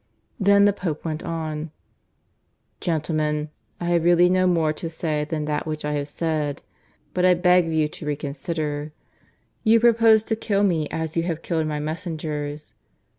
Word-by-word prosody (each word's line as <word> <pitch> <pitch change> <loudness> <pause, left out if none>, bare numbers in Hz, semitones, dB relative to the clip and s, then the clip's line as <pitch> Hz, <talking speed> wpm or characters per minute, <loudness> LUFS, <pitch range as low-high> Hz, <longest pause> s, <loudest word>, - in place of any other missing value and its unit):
Then 200 0 +5
the 205 - +4
Pope 170 -6 -4
went 155 0 -3
on. 160 -2 -4 1.1
"Gentlemen, 155 -2 -1 0.3
I 175 - -4
have 170 -1 +2
really 175 +1 +5
no 185 0 +3
more 165 -3 +2
to 165 +2 -5
say 155 -2 -2
than 150 -1 -3
that 150 +1 -2
which 155 -1 -3
I 150 - -1
have 145 0 -2
said. 150 -2 -2 0.5
But 180 - 0
I 180 0 +6
beg 180 -1 +4
of 165 - -2
you 155 -1 +2
to 150 0 -9
reconsider. 150 +1 -3 0.7
You 225 0 +5
propose 225 -2 +5
to 220 - -1
kill 205 -2 0
me 165 -6 +1
as 160 -1 -4
you 165 - +2
have 165 -1 -3
killed 160 -2 -1
my 150 -1 -2
messengers. 150 -2 -4
160 Hz, 170 wpm, -23 LUFS, 150-180 Hz, 1.1 s, I